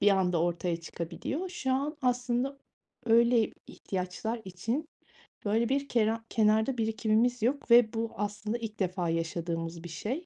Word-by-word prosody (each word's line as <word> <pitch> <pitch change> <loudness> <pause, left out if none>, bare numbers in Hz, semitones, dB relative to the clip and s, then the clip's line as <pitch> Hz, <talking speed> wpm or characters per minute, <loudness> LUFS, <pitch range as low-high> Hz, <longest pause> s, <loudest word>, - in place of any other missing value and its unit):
bir 205 - +5
anda 180 -4 +2
ortaya 175 0 -1
çıkabiliyor. 170 - -4
Şu 265 -7 -2
an 285 +4 -1
aslında 250 +2 0 0.5
öyle 235 0 +5 0.2
ihtiyaçlar 195 +5 -4
için, 225 - -3 0.6
böyle, 225 +3 +2
bir 280 +1 0
kenar 225 -1 +1
kenarda 220 +3 +3
birikimimiz 225 +2 +1
yok 250 +2 0
ve 235 -1 +7
bu 225 0 -2
aslında 210 +2 -2
ilk 225 -3 -6
defa 180 -3 0
yaşadığımız 165 0 -2
bir 175 - -7
şey. 245 - -4
220 Hz, 140 wpm, -30 LUFS, 180-245 Hz, 0.6 s, ve